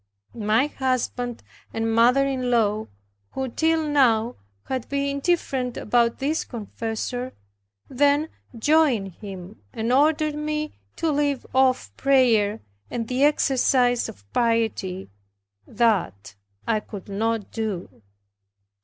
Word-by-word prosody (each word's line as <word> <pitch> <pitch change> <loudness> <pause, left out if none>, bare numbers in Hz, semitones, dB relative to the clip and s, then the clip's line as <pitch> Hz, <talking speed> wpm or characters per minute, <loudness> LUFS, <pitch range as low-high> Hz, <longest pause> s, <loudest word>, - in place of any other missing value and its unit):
My 220 +3 +2
husband 255 -3 -2 0.3
and 225 0 -1
mother 245 +4 +5
in 260 -2 -1
law, 215 -3 +1 0.5
who 265 -1 -2
till 320 +4 +1
now 245 -5 +3 0.3
had 260 -3 -4
been 280 0 0
indifferent 270 -6 -1
about 235 +1 +2
this 300 +4 -1
confessor, 230 +2 -5 0.5
then 285 +3 +2 0.3
joined 265 -6 +3
him 190 +1 -10
and 230 +1 -1
ordered 305 +2 +3
me 300 0 -3 0.2
to 330 -1 0
leave 285 -2 0
off 255 - +2
prayer, 230 -6 +3 0.3
and 230 -2 -3
the 255 +3 0
exercise 255 -4 +3
of 100 +1 -13
piety; 225 - 0 0.6
that 195 - 0 0.3
I 220 -2 +2
could 205 -3 -10
not 220 +1 -2
do. 210 - -4
245 Hz, 110 wpm, -24 LUFS, 220-275 Hz, 0.6 s, mother